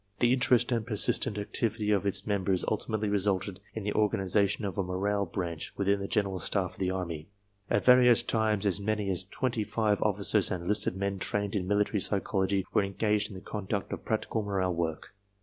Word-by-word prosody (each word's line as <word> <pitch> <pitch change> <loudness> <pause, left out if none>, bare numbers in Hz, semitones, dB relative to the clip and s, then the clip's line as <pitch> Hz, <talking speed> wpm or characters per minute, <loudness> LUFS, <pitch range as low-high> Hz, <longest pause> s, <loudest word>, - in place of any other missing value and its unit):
The 120 +2 +3
interest 125 -1 +3
and 115 -2 +1
persistent 105 -2 0
activity 105 +1 -1
of 100 -1 +1
its 100 - 0
members 95 -3 0
ultimately 110 0 -1
resulted 100 -1 0 0.2
in 110 - -4
the 105 - -2
organization 100 0 +1
of 100 0 -4
a - - +4
Morale 100 +2 -1
Branch 85 -2 -4
within 100 0 +1
the 100 - -4
General 100 -3 -1
Staff 90 +1 -1
of - - -16
the 95 -1 0
Army. 85 -3 -4 0.4
At 100 - +1
various 125 -2 +6
times 110 -3 0
as 100 -1 +2
many 105 -1 -1
as 95 0 +1
twenty 115 +3 -2
five 105 -1 0
officers 105 0 +2
and 90 -2 -3
enlisted 100 +1 0
men 100 0 -2
trained 100 +2 0
in 90 -3 -1
military 105 +1 +1
psychology 95 -1 0
were - - +4
engaged 105 +1 0
in 100 - -10
the 95 - -8
conduct 100 -1 -4
of - - -6
practical 110 - -1
• - - -6
morale 95 -2 0
work. 85 0 -3
100 Hz, 195 wpm, -29 LUFS, 95-105 Hz, 0.4 s, various